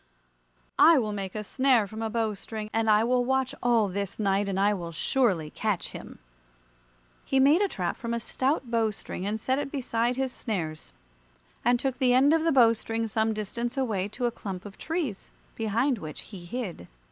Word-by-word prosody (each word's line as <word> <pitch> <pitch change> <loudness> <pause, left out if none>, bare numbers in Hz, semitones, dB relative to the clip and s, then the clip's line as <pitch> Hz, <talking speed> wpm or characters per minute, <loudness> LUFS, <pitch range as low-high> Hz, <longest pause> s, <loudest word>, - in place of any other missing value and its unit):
I 325 0 +8
will 215 -5 0
make 195 -1 -5
a 215 - -3
snare 260 0 +3
from 220 +2 -8
a 225 - -1
bow 225 -1 0
string, 215 +1 -7
and 225 0 +1
I 215 +1 +5
will 245 +1 +2
watch 265 +1 0
all 235 -3 +3
this 200 0 -4
night, 200 -1 +1
and 190 0 -1
I 205 +1 +3
will 170 -4 -5
surely 175 - +1
catch 210 -5 -1
him." - - -10 1.1
He 270 - +1
made 290 +7 +5
a 405 - +3
trap 180 - -3
from 235 - -5
a 235 - 0
stout 260 +1 -1
bow 225 -2 +2
string 195 -2 -6
and 215 +2 -2
set 260 +5 0
it 285 - -4
beside 240 -3 0
his 265 -1 -1
snares, 160 -9 -4 0.7
and 245 +1 +3
took 265 -1 -2
the 255 -2 +4
end 275 +4 +5
of 325 -1 +2
the 330 - +3
bow 235 -4 +6
string 225 0 -3
some 220 +1 +1
distance 235 +4 -3
away 215 -8 0
to 245 +4 -4
a 240 - +1
clump 195 -4 -7
of 200 -1 -9
trees, 315 - -3 0.3
behind 230 +4 0
which 155 -2 -7
he 185 -5 -11
hid. 185 - -5
225 Hz, 200 wpm, -27 LUFS, 200-255 Hz, 1.1 s, I